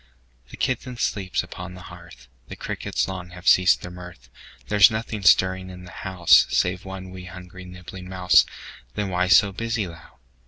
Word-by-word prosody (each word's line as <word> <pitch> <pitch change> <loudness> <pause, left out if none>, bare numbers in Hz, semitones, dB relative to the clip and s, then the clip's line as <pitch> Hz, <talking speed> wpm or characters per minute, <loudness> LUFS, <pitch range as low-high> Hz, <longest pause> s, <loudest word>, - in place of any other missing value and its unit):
The - - -11
kitten 125 -1 -2
sleeps 95 -5 -1
upon 90 +1 -9
the 90 - -11
hearth, 85 -7 -13 0.2
The - - -8
crickets - - -3
long 95 -2 -6
have 90 - -10
ceased 90 -1 +5
their 90 - -7
mirth; 90 -8 -12 0.4
There's 105 +1 +6
nothing 110 -1 -4
stirring 95 0 +3
in 90 0 -10
the 90 - -12
house 95 -2 +4
Save 90 +1 0
one 95 -1 -8
'wee', 95 0 -9
hungry, 90 0 -11
nibbling 90 0 -10
mouse, 90 -1 +4 0.5
Then 105 -2 -2
why 90 0 0
so 100 +2 +5
busy 115 +1 -2
thou? 80 -6 -13
95 Hz, 170 wpm, -23 LUFS, 90-95 Hz, 0.5 s, There's